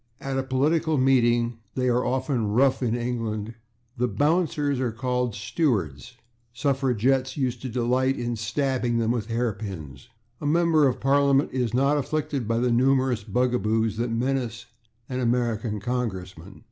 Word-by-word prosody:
At 135 -1 -4
a - - +2
political 150 +4 +1
meeting 120 -3 +2 0.2
(they 125 -1 0
are 125 0 +2
often 130 -3 -1
rough 130 +7 +2
in 120 -2 0
England) 115 -3 -3 0.4
the 125 +1 +1
/bouncers/ 145 - +1
are 125 -3 0
called 125 0 -1
/stewards/; 110 - -1
the - - -30 0.4
suffragettes 130 0 0
used 125 -4 -1
to 130 - -4
delight 125 +3 +1
in 120 0 -2
stabbing 120 +2 -1
them 115 0 +1
with 115 -3 -2
hatpins. 100 - -4 0.3
A 145 - -2
member 160 -1 +4
of 130 - -1
Parliament 140 0 +3
is 125 -3 -1
not 140 +3 +3
afflicted 140 -3 -2
by 115 0 +1
the 120 +1 +1
numerous 130 -2 +2
bugaboos 110 -1 0
that 120 +1 -1
menace 120 0 -2 0.4
an 130 -1 -3
American 115 -3 0
congressman. 95 -6 -4
125 Hz, 145 wpm, -25 LUFS, 115-135 Hz, 0.4 s, member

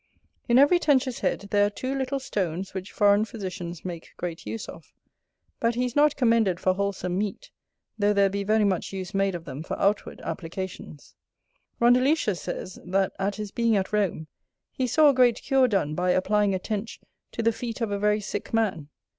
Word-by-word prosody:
In 240 - +5
every 290 +6 +6
Tench's 270 -5 +2
head 200 - -2
there 205 -1 +4
are 205 - +3
two 255 +6 -4
little 270 0 -2
stones 190 -6 -3
which 190 +1 -6
foreign 205 -1 +4
physicians 185 -6 -6
make 170 -3 -7
great 170 -2 -5
use 225 - -5
of, - - -12 0.7
but 230 0 +1
he 250 +1 +1
is 245 - -4
not 295 0 +4
commended 230 -8 +2
for 185 - +2
wholesome 190 -2 -2
meat, 210 - -4 0.5
though 205 0 +3
there 200 -1 +4
be 200 +1 -2
very 215 +2 +2
much 190 -4 0
use 190 0 -6
made 195 -1 +1
of 170 -1 -7
them 135 +1 -6
for 160 - -5
outward 200 +1 0
applications. 175 -3 -7 0.7
Rondeletius 245 - +3
says, 185 - -6
that 190 +1 0
at 195 +1 -1
his 210 -2 -6
being 230 -1 +2
at 190 +2 -2
Rome, 195 -6 0 0.5
he 255 - -1
saw 295 +6 +5
a - - +4
great 250 -3 +4
cure 265 -1 +3
done 190 -9 0
by 180 +3 0
applying 200 +2 +2
a - - +1
Tench 210 +3 -4 0.3
to 230 - -3
the 230 - +4
feet 230 +1 -5
of 225 -3 -2
a 200 - -1
very 210 +1 +2
sick 205 0 -5
man. 190 -10 0
205 Hz, 195 wpm, -26 LUFS, 185-235 Hz, 0.7 s, every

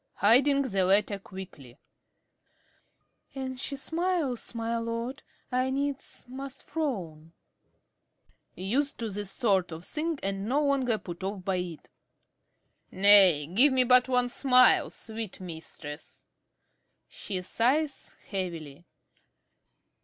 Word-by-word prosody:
~Dorothy~ - - -34
(hiding 275 +7 +5
the 195 -7 0
letter 200 +2 +2
quickly). 180 -11 -11 1.6
An 260 -1 -4
she 275 +2 -3
smiles, 320 -5 -2
my 230 0 -2
lord, 230 +3 -4 0.3
I 255 +1 +1
needs 275 +1 -3
must 270 +1 -8
frown. 170 - -4 1.2
~Carey~ 185 - -7
(used 275 +7 0
to 225 -3 -4
this 205 0 -4
sort 195 -6 +1
of 165 +2 -7
thing 315 -1 -3
and 195 +2 -3
no 290 +3 +2
longer 265 -5 +1
put 175 -2 -9
off 195 -1 -5
by 190 -1 0
it). 175 -3 -6 1.0
Nay, 190 -6 +6
give 240 - +5
me 260 -1 +4
but 250 +1 +5
one 250 -1 +2
smile, 255 0 +5
sweet 220 -3 -6
mistress. 160 -4 -7 0.8
(_She 185 -3 -5
sighs 275 +9 0
heavily. 170 -5 -5
225 Hz, 115 wpm, -28 LUFS, 185-265 Hz, 1.6 s, Nay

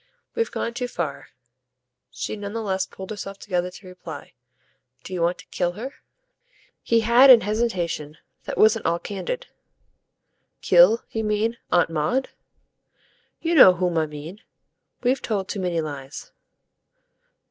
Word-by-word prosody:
"We've 460 -1 -1
gone 235 - -3
too 245 +1 -3
far," 165 - -5 0.8
she - - -5
none 205 -1 -6
the 230 0 -3
less 190 -2 -1
pulled 190 +2 -9
herself 200 -2 -6
together 180 -3 -2
to 185 +1 -14
reply. 180 -3 -10 0.7
"Do 185 - -8
you 180 - -2
want 170 +2 +1
to - - -14
kill 175 -1 -1
her?" 245 +9 -7 0.9
He 230 -1 +2
had 240 +4 +6
an 245 -3 +10
hesitation 180 -8 -2 0.3
that - - -5
wasn't 220 +1 +4
all 170 - +1
candid. - - -5 1.2
"Kill, 185 +6 +6
you 225 - -2
mean, 215 +2 0
Aunt 175 -1 +3
Maud?" 165 - 0 1.1
"You 335 +1 0
know 190 - +8
whom 180 -1 -1
I 160 -1 +1
mean. 150 +7 -9 0.6
We've 255 +2 +1
told 200 -4 -2
too 205 - -4
many 175 -3 -1
lies." 145 - -7
195 Hz, 145 wpm, -23 LUFS, 175-230 Hz, 1.2 s, an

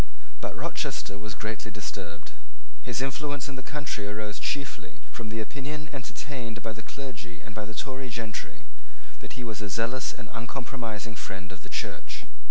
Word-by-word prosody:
But - - +1
Rochester 100 +1 +2
was 105 0 -1
greatly 110 0 +1
disturbed. 105 -2 -2 0.5
His 125 +1 +3
influence 140 0 +2
in 140 - -1
the 130 - -1
country 140 -7 +1
arose 105 0 +1
chiefly 140 -1 +1
from 115 -2 -2
the 110 +1 +2
opinion 150 +5 -1
entertained 125 -3 -1
by 110 - +3
the 110 - -4
clergy 105 -10 -3
and 110 +8 -6
by 105 0 +1
the 110 +1 -4
Tory 130 -1 +1
gentry, 110 -2 -1 0.5
that - - -4
he 125 - 0
was 110 -2 0
a 105 - +1
zealous 115 +6 +4
and - - -5
uncompromising 115 -3 0
friend 95 -2 -2
of 95 -2 -6
the - - -8
Church. - - 0
115 Hz, 170 wpm, -33 LUFS, 105-135 Hz, 0.5 s, zealous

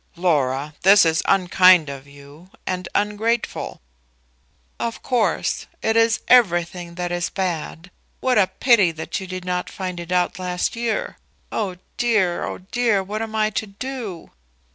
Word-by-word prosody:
"Laura, 150 -4 0
this 195 0 +7
is 160 0 +2
unkind 180 -3 +5
of 140 0 -8
you, 145 +5 -15 0.2
and 180 -1 -3
ungrateful." 210 - -1 1.0
"Of 230 -1 -4
course; 245 -4 0 0.2
it 220 - +1
is 225 0 +3
everything 175 -6 +3
that 175 0 -3
is 175 0 -1
bad. 180 -2 -4 0.3
What 255 -4 +2
a 190 - +4
pity 210 -1 +3
that 160 +4 -4
you 190 - -7
did 185 0 -6
not 180 0 -2
find 185 -2 -5
it 170 +1 -8
out 180 0 +1
last 180 +4 -2
year! 230 -2 -2 0.3
Oh 195 -5 -2 0.2
dear, 210 -7 +1
oh - - -4
dear! 230 -5 +2
what 210 +3 -4
am 220 -1 -5
I 215 0 +1
to 215 +1 -3
do?" 215 -3 -7
185 Hz, 150 wpm, -22 LUFS, 175-215 Hz, 1.0 s, this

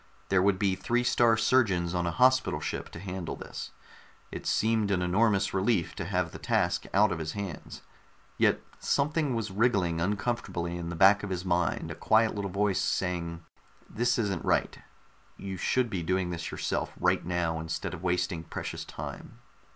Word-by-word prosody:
There 95 -1 +4
would 100 0 +3
be 95 0 +1
Three 120 +6 0
star 120 -2 +4
Surgeons 100 -8 +2
on 90 -1 0
a - - 0
Hospital 130 -11 +4
Ship - - -4
to - - -9
handle 90 -3 -5
this; - - -7 0.6
it - - -6
seemed 110 -2 +2
an 90 -2 +1
enormous 100 +2 +2
relief 95 -2 +1
to 90 - -5
have 90 -2 -1
the - - -9
task 85 0 0
out 105 +2 +4
of 80 - -2
his 80 -1 -4
hands. 100 -5 -6 0.5
Yet - - +3 0.2
something 145 -2 +1
was 110 -3 -2
wriggling 95 -6 +1
uncomfortably 95 -3 -2
in 85 -1 -4
the 85 - -4
back 100 +3 +6
of 105 - -5
his 90 -1 -3
mind, 90 -2 0
a - - -3
quiet 110 0 +3
little 100 -1 -3
voice 100 0 +1
saying 85 -2 -2 0.5
_this 120 +3 +1
isn't 100 -7 -1
right, - - +1 0.6
you 95 -1 -5
should 125 +7 +1
be 95 - -2
doing 90 +1 0
this 85 -1 -4
yourself - - -2
right - - +2
now 85 -2 -1
instead 80 +3 -4
of 90 - -7
wasting 90 -2 -1
precious - - -5
time.... - - -8
95 Hz, 175 wpm, -29 LUFS, 85-105 Hz, 0.6 s, back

